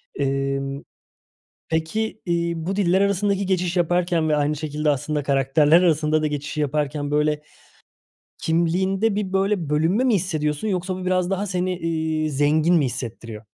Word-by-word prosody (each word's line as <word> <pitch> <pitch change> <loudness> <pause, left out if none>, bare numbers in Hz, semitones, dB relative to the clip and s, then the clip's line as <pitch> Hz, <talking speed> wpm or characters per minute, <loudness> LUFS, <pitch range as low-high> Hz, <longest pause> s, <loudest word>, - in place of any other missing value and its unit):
Emm, 135 0 -2 0.9
peki, 215 +8 -2
iii, 170 -1 -1
bu 190 +2 -2
diller 190 -2 +2
arasındaki 200 0 +1
geçiş 180 -1 0
yaparken 175 -1 +1
ve 150 - +2
aynı 150 +1 0
şekilde 150 0 -1
aslında 145 +2 -1
karakterler 145 +4 +3
arasında 155 -2 +2
da - - +1
geçişi 150 0 -3
yaparken, 145 0 -1
böyle, 150 0 +1 1.0
kimliğinde 190 +6 +1
bir, 200 -2 -3
böyle, 195 -4 0
bölünme 165 +10 +2
mi 250 -4 +3
hissediyorsun 155 -2 -1
yoksa 185 -2 -2
bu 185 0 -6
biraz 185 -1 +1
daha 195 +1 -1
seni, 180 -1 -1
iii, 160 -2 -1
zengin 150 +4 +3
mi 155 -4 +3
hissettiriyor? 115 -3 -6
160 Hz, 145 wpm, -22 LUFS, 150-185 Hz, 1.0 s, karakterler